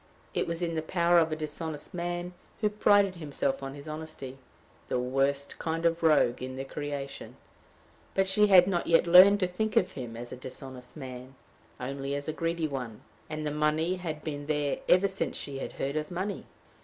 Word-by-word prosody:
It - - 0
was 170 +1 -2
in 165 -1 -1
the 160 - -1
power 170 +1 +3
of 160 -1 +2
a - - 0
dishonest 155 0 -5
man 175 0 -3 0.3
who 210 -2 +1
prided 205 -3 +4
himself 145 -4 -2
on 135 0 -6
his 145 +1 -10
honesty 155 -4 -7 0.5
the - - 0
worst 135 +3 0
kind 165 +1 -2
of 165 0 +2
rogue 150 -7 +4
in 130 0 -5
the 135 +1 -5
creation; 145 -1 -6 0.8
but 195 - +3
she 210 +2 +4
had 185 -3 +8
not 180 -2 -1
yet 165 +1 +5
learned 185 +4 +8
to 185 - +3
think 210 +4 -2
of - - +3
him 120 -4 -7
as 120 +1 -7
a - - -5
dishonest 130 +1 -8
man 130 -1 -8 0.4
only 135 +2 -3
as 145 0 -3
a 155 - -1
greedy 165 0 -1
one 125 -6 -5 0.3
and 155 0 -4
the 150 - -1
money 155 +4 +1
had 160 -4 -5
been 145 -2 -5
there 145 -2 0
ever 185 +2 +6
since 195 0 -3
she 140 -1 -5
had - - -5
heard 140 +2 -3
of 155 0 -2
money. 185 +3 -4
155 Hz, 195 wpm, -29 LUFS, 135-175 Hz, 0.8 s, had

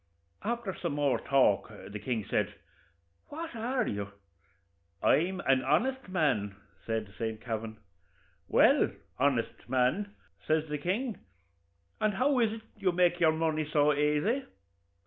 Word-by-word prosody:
After 230 -3 -2
some - - -3
more 145 -2 +1
talk 135 -1 +3 0.2
the 105 - -5
king 115 -3 -2
says, - - +1 0.8
'What 320 -2 -6
are 245 +3 -1
you?' 100 -1 -3 0.9
'I'm 180 +3 +3
an 130 -1 +2
honest 260 - +1
man,' 135 - +1 0.3
says 110 -1 -1
Saint 110 -1 -2
Kavin. 110 -1 -5 0.7
'Well, - - +5 0.3
honest 130 -4 0
man,' 130 +12 +1 0.3
says 155 0 +2
the 150 0 -2
king, 205 - -1 0.8
'and 215 -2 +1
how 265 +4 +2
is 225 -3 +3
it 225 0 -6 0.2
you 195 -3 +1
make 175 0 +2
your 160 -2 +5
money 155 -1 -1
so 150 0 +4
aisy?' 150 - +1
155 Hz, 130 wpm, -30 LUFS, 130-210 Hz, 0.9 s, Well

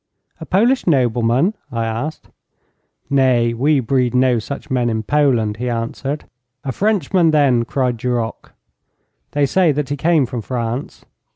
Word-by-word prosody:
'A - - -9
Polish 235 +7 +2
nobleman?' 125 - +2 0.2
I 115 -2 -2
asked. 115 +8 -4 0.8
'Nay, 125 -4 +3
we 140 +5 +2
breed 125 0 0
no 125 -2 +3
such 140 +6 -7
men 125 -2 +1
in 110 -1 -2
Poland,' 120 -6 +1
he 125 +2 -3
answered. 120 +5 -3 0.4
'A 135 - -2
Frenchman, 190 - +1
then?' 140 -6 +3
cried 125 -1 -1
Duroc. 120 -1 -3 0.8
'They 145 -1 +2
say 170 +4 +3
that 145 -1 -2
he 145 - -1
came 160 -2 +2
from 120 -1 -5
France.' 120 +2 -4
130 Hz, 145 wpm, -18 LUFS, 120-150 Hz, 0.8 s, Nay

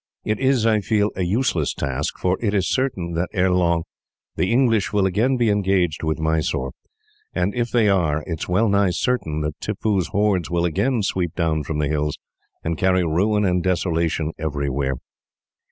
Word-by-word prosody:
"It 110 0 -1
is, 130 -4 +2
I 110 -2 +4
feel, 105 0 +1
a 95 - -3
useless 90 - 0
task, 70 +1 -2
for 90 0 +1
it 105 -3 0
is 95 -2 +1
certain 95 -11 -1
that, 85 +2 -1
ere 95 -2 +2
long, 85 -2 +2 0.5
the 95 - 0
English 115 -4 +2
will 100 -2 +2
again 110 +8 +1
be 120 -3 +2
engaged 95 -5 +1
with 80 -1 -1
Mysore; 80 -4 -1 0.6
and 95 +3 0
if 120 -1 -1
they 115 -3 +3
are, 80 -6 +1
it 80 -2 -4
is - - -5
well 100 +6 +3
nigh 100 -1 +3
certain 85 -7 -1
that 75 0 -4
Tippoo's 105 -3 -1
hordes 100 -6 +1
will 85 0 +1
again 115 - 0
sweep 90 -4 -1
down 80 -3 0
from 75 +1 -4
the 75 -1 0
hills, 75 0 -1 0.5
and 80 -1 -2
carry 95 -1 +3
ruin 100 +6 +1
and 90 -1 +1
desolation 85 -3 0
everywhere. 70 -3 -1
90 Hz, 180 wpm, -22 LUFS, 80-105 Hz, 0.6 s, I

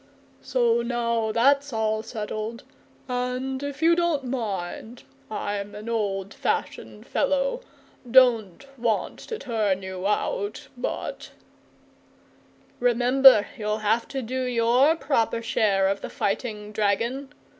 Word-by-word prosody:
So 235 -2 +2
now 235 -2 -1
that's 275 +5 +3
all 220 -1 0
settled, 220 0 -5 0.4
and 250 +1 -2
if 285 +2 -5
you 335 +1 +6
don't 340 -5 +1
mind 225 -2 -4 0.3
I'm 205 -1 -4
an 210 +2 -8
old 200 -4 -2
fashioned - - -3
fellow - - 0 0.5
don't 240 -3 +4
want 230 -2 -1
to 450 - -6
turn 210 - -1
you 190 0 -4
out, 410 - -2
but - - -4 0.7
" - - -32
"Remember, 245 -1 +6
you'll 210 -3 -2
have 225 +3 +2
to 270 -2 -4
do 260 +3 -3
your 250 +4 +3
proper 230 -7 0
share 205 -4 +2
of 195 +1 -1
the - - -5
fighting, 210 0 -3
dragon!" 230 +7 -1
235 Hz, 120 wpm, -25 LUFS, 210-260 Hz, 0.7 s, you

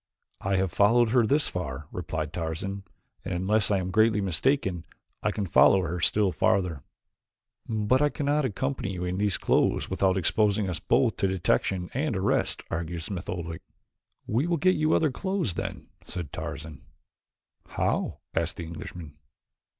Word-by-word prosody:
"I 95 0 0
have 95 -1 +1
followed 115 +6 +4
her 120 -1 +3
this 145 +6 +3
far," 75 -5 -4
replied 80 -3 -4
Tarzan, 90 +4 -4 0.4
"and - - -3
unless 100 +4 +2
I 100 - +3
am 95 0 -3
greatly 110 +2 +4
mistaken 95 - 0 0.4
I - - +1
can 105 -1 -2
follow 95 +2 +5
her 85 +1 -3
still 100 +3 +2
farther." 90 -5 +1 0.9
"But 110 +4 +2
I 150 - +4
cannot 145 0 0
accompany 130 -2 -2
you 90 0 -4
in 90 +1 -2
these 100 -4 +2
clothes - - +1
without 95 -1 +2
exposing 105 +2 +2
us 90 -3 -3
both 125 -4 +2
to 95 - +1
detection 95 0 0
and 135 -2 -1
arrest," 95 +2 0
argued 85 0 -3
Smith 90 0 -5
Oldwick. 85 -2 -4 0.6
"We 125 +9 0
will 170 -1 +1
get 185 +4 +4
you 155 -1 +2
other 155 -3 +2
clothes, 190 - -1
then," - - -5
said 90 -5 -6
Tarzan. 75 -3 -6 0.9
"How?" - - -1
asked - - -1
the 85 - -5
Englishman. 80 -2 -8
95 Hz, 160 wpm, -27 LUFS, 85-115 Hz, 0.9 s, follow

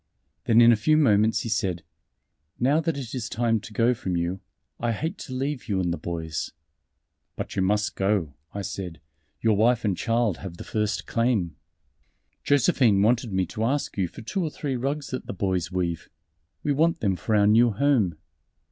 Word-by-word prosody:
Then 115 +1 +5
in 120 0 +8
a - - +5
few 155 +9 +3
moments 110 -6 +3
he 115 - -4
said: 95 -6 -1 0.8
"Now 140 +5 +3
that 165 -2 -1
it 125 -5 -6
is 125 -2 -3
time 115 -1 +1
to 110 - -11
go 115 +3 +3
from 95 -6 -3
you, 85 +3 -2 0.4
I 120 0 0
hate 160 - -4
to 130 - -7
leave 135 -1 -3
you 100 -2 +1
and 90 -2 0
the - - -3
boys." 80 -1 -4 0.8
"But - - -5
you - - +1
must 105 +2 +1
go," 95 -7 0 0.2
I 100 - -5
said, 90 -3 -6 0.4
"your 110 -2 +3
wife 115 +3 +3
and 100 -3 +1
child 115 -2 0
have 90 -3 -8
the - - -7
first 105 -1 -2
claim." 115 - 0 0.9
"Josephine 120 -7 +3
wanted 115 0 +2
me 95 -1 +1
to 110 +6 -4
ask 140 +5 -1
you 95 -3 0
for 110 - -11
two 190 - -2
or 160 - -1
three 145 -3 -3
rugs 140 +4 -2
that 130 - -5
the - - -4
boys 95 -2 -1
weave. 85 -3 -2 0.5
We 150 - +1
want 165 +4 +2
them 95 -3 +1
for 105 +6 -1
our 100 -1 +4
new 115 +3 +5
home." 115 - +1
110 Hz, 190 wpm, -25 LUFS, 95-125 Hz, 0.9 s, in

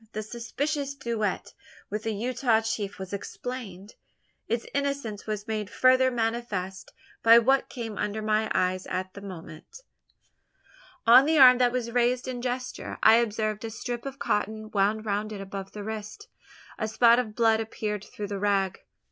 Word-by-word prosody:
The 215 - -3
suspicious 280 +6 -3
duetto 225 -7 -2 0.4
with 210 +1 -2
the 225 - -2
Utah 235 0 +1
chief 210 -3 -3
was 190 0 -7
explained. 205 -2 -6 0.5
Its 235 0 -1
innocence 280 -8 -2
was 210 0 -4
made 215 -2 -3
further 255 +2 +4
manifest, 225 -6 -3 0.3
by 230 +1 +8
what 265 +3 +3
came 225 -5 -6
under 210 +1 -2
my 215 0 +1
eyes 185 0 0
at 185 0 -3
the 200 - -10
moment. 185 - -10 1.2
On 250 +5 +8
the 320 0 +3
arm 255 -2 +8
that 245 -1 +4
was 240 -2 -2
raised 245 +1 +1
in 250 -1 -4
gesture, 250 0 -4
I 220 +1 +8
observed 215 -2 -1
a 225 - -3
strip 240 +3 -5
of 275 0 -7
cotton 215 -2 -2
wound 210 +2 +1
round 210 +1 -1
it 205 - -6
above 195 0 -7
the 210 - -6
wrist. 220 - -7 0.5
A 215 - -1
spot 235 +2 +5
of 215 -4 -4
blood 225 -2 +3
appeared 215 -2 -4
through 205 -1 -7
the 200 -1 -3
rag! 195 -2 +1
220 Hz, 165 wpm, -27 LUFS, 205-245 Hz, 1.2 s, by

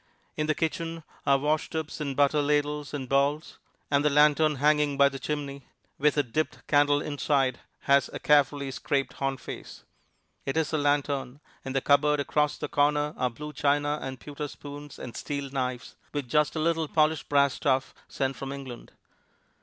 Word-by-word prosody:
In 155 - -1
the 155 - +1
kitchen 165 0 -2 0.2
are 140 0 +5
washtubs 155 +2 -2
and 140 -2 -2
butter 145 +1 +3
ladles 145 0 0
and 140 -3 -4
bowls; 140 +3 0 0.3
and 140 0 +3
the 150 - +4
lantern 150 +1 +4
hanging 150 0 +2
by 140 0 +6
the 135 -1 -7
chimney, 140 -2 -4 0.3
with 150 +1 +3
a 145 - +4
dipped 155 +5 -3
candle 145 0 +3
inside, 140 -3 0 0.2
has 140 -1 +3
a - - -5
carefully 145 -1 +2
scraped 135 +1 -1
horn 135 -1 -2
face. - - -9 0.6
It 135 +3 -2
is 160 0 0
a - - +3
lanthorn. 145 -2 0 0.2
In 135 - -5
the 135 - +1
cupboard 145 +2 +3
across 150 +1 +1
the - - -4
corner 150 +1 +1
are 125 - 0
blue 150 +5 -8
china 145 +1 +1
and 130 -1 -6
pewter 145 +2 -6
spoons 145 0 -10
and 120 - -8
steel 140 -2 -4
knives, 125 -2 -3 0.2
with 145 -3 -3
just 150 +6 +2
a - - -1
little 165 0 +1
polished 155 0 +1
brass 140 -2 +4
stuff 130 -1 0
sent 135 0 -2
from 135 0 -6
England. 135 -4 -8
145 Hz, 175 wpm, -27 LUFS, 140-150 Hz, 0.6 s, by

